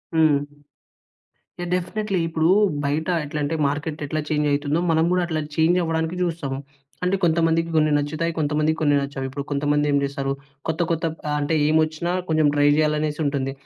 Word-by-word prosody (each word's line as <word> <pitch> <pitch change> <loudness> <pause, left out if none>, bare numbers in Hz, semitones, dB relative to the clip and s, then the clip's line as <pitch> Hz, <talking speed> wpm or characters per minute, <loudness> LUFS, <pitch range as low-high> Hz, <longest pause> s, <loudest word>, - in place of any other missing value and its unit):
హ్మ్. 145 -3 +3 1.1
Yeah! 175 - -4
Definitely. 195 +2 -1
ఇప్పుడు 160 0 +1 0.4
బయట 150 +3 -1 0.2
ఎట్లంటే 150 +1 -2
మార్కెట్ 150 +2 -3
ఎట్లా 155 +2 -2
చేంజ్ 150 -1 +1
అయితుందో 145 +2 0
మనం 160 0 +3
కూడా 180 - +2
అట్లా 160 -2 -1 0.2
చేంజ్ 165 +3 +3
అవ్వడానికి 160 +1 -1
చూస్తాము. 160 -6 -2 0.5
అంటే 180 +2 +2
కొంతమందికి 165 0 +2
కొన్ని 155 -1 +3
నచ్చుతాయి. 155 +3 -1
కొంతమందికి 155 +1 +1
కొన్ని 145 -2 +3
నచ్చవు. 140 -1 -4
ఇప్పుడు 140 +2 -5
కొంతమంది 145 +1 +1
ఏం 140 - +3
చేస్తారు, 140 0 -2 0.4
కొత్త, 160 +2 -1
కొత్త 165 +1 0 0.2
ఆహ్, 150 - 0
అంటే 145 +2 -1
ఏమోచ్చినా 155 +2 +1 0.2
కొంచెం 155 -1 +3
ట్రై 145 0 +3
జేయాలనేసి 150 0 0
ఉంటుంది. 140 -2 -1
155 Hz, 160 wpm, -23 LUFS, 145-165 Hz, 1.1 s, హ్మ్